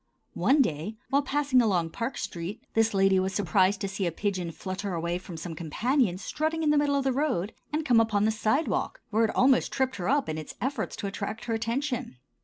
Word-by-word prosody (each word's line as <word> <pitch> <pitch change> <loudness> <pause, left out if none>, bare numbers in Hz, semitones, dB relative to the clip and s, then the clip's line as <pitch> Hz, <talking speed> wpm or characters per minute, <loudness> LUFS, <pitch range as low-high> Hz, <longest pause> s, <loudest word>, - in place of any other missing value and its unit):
One 265 - +4
day, 165 - -3 0.2
while 280 +1 +4
passing 275 -2 +2
along 180 -7 +1
Park 230 +8 -3
street, 175 +5 -5
this 225 -2 +2
lady 195 -1 +4
was 190 +1 -1
surprised 195 +1 +2
to 195 - -1
see 195 -1 -2
a - - -1
pigeon 185 -1 -2
flutter 185 +3 -4
away 170 +1 -1
from 180 -2 -9
some 165 +1 -6
companions 195 - 0
strutting 315 +5 -1
in 300 - +3
the 300 - +3
middle 290 -1 +2
of 280 - +1
the 265 -1 +1
road, 245 - 0 0.2
and 305 +1 -1
come 240 -5 +5
upon 215 -2 +2
the 220 - +3
sidewalk, 220 +8 0
where 225 +2 +3
it 220 - -3
almost 260 0 +4
tripped 260 -3 0
her 180 - -2
up 285 +1 +2
in 155 0 -3
its 155 - -8
efforts 260 -3 -2
to - - -5
attract 200 +2 -4
her 230 - -1
attention. 235 - -2
215 Hz, 215 wpm, -28 LUFS, 185-265 Hz, 0.2 s, come